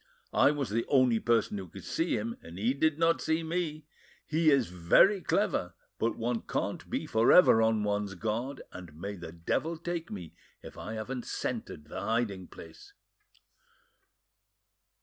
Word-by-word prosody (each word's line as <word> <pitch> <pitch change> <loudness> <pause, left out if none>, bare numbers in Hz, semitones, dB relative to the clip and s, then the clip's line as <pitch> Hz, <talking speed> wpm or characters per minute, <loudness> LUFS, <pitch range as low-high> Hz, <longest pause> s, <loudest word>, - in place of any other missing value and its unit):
I - - +5
was 145 -6 -2
the 115 +2 +1
only 130 -4 +4
person 115 -3 +1
who 95 - -7
could 95 +2 -11
see 165 +1 0
him, 115 +2 -3
and 85 +2 -11
he 115 +6 +1
did 150 +2 +1
not 165 0 +2
see 160 +1 0
me. 160 -2 -3 0.4
He 160 0 +2
is 140 -4 +4
very 90 - +4
clever, 90 - 0 0.2
but 115 - 0
one 115 0 -1
can't - - -3
be - - -2
for 110 +1 +3
ever 180 -11 +7
on 110 -1 +2
one's 105 -1 -1
guard, 115 +7 -3
and 90 -5 -10
may 100 +3 -4
the 85 -3 -8
devil 120 - -2
take 170 0 -4
me 90 -6 -8 0.3
if - - -10
I 110 - -6
haven't 120 +3 -5
scented 75 - -4
the 75 - -6
hiding 110 -5 -1
place." 80 -1 -13
115 Hz, 165 wpm, -30 LUFS, 100-150 Hz, 0.4 s, ever